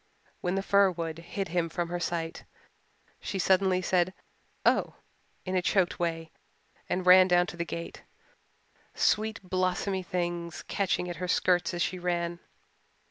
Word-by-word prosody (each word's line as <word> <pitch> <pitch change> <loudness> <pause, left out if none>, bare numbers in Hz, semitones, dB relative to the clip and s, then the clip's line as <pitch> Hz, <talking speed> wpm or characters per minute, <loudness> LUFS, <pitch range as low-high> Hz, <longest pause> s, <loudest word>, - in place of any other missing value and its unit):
When 180 +1 -1
the 195 - -1
fir 200 0 +4
wood 165 -2 -4
hid 190 +2 -5
him 170 0 0
from 170 +1 -3
her 175 0 -2
sight 165 -1 -3 0.8
she 195 - -4
suddenly 190 0 +2
said 185 0 +1 0.5
"Oh," - - +2 0.5
in 185 0 -2
a 185 - +3
choked 185 0 +1
way 165 -2 -2 0.6
and 185 0 -1
ran 185 0 +8
down 175 -1 +4
to - - -9
the 170 - -1
gate, 170 0 -6 0.9
sweet 220 +1 +1
blossomy 185 +1 -1
things 175 -4 -3
catching 185 -2 -1
at 175 -2 -5
her 180 +2 -3
skirts 180 0 +2
as 175 - +1
she 185 - -2
ran. 175 -1 -2
180 Hz, 150 wpm, -29 LUFS, 170-185 Hz, 0.9 s, ran